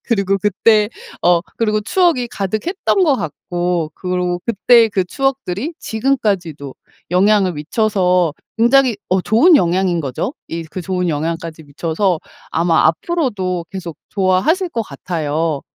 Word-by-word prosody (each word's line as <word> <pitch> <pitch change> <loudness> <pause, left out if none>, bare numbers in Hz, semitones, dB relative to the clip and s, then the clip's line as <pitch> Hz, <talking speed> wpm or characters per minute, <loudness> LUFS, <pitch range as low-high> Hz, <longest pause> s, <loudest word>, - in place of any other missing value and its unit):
그리고 195 -4 +1
그때 210 +2 +3 0.3
어 175 -1 +4 0.2
그리고 215 -2 +1
추억이 330 - +1
가득했던 220 - -1
것 295 - +3
같고 175 - -3
그리고 180 -1 -2
그때의 230 +2 +4
그 195 -3 0
추억들이 270 - -2
지금까지도 200 - -2 0.4
영향을 195 +1 +3
미쳐서 180 0 +1 0.3
굉장히 240 -1 +4
어 185 0 +2
좋은 290 - +5
영향인 175 -3 +1
거죠 140 - -3
이 165 0 -4
그 175 +3 -7
좋은 180 -1 -1
영향까지 165 +1 -3
미쳐서 165 +4 -1 0.3
아마 165 -1 +3
앞으로도 185 - -1
계속 175 -5 -7
좋아하실 205 - +1
것 230 -7 -2
같아요. 155 -2 -3
185 Hz, 300 characters per minute, -18 LUFS, 170-230 Hz, 0.4 s, 좋은